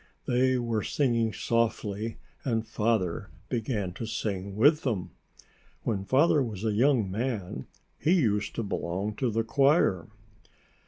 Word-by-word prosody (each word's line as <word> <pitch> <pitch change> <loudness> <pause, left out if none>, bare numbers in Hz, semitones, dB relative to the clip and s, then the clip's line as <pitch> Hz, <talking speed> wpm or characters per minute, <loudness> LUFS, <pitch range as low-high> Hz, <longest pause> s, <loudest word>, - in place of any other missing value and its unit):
They 130 +1 +2
were 115 -3 -1
singing 115 -5 +1
softly 110 0 -1 0.3
and 115 -6 0
Father 110 -5 0 0.2
began 110 -6 -2
to 115 +4 -5
sing 100 -3 -3
with 145 +8 +5
them. 95 - -2 0.7
When 100 -4 -1
Father 145 +5 +4
was 110 -4 -3
a 110 - +1
young 120 -3 +3
man, 105 - -3 0.3
he 165 - +3
used 105 - +1
to 115 - -1
belong 100 +1 -2
to 130 - +1
the 115 +1 0
choir. 135 - +3
115 Hz, 130 wpm, -28 LUFS, 100-125 Hz, 0.7 s, with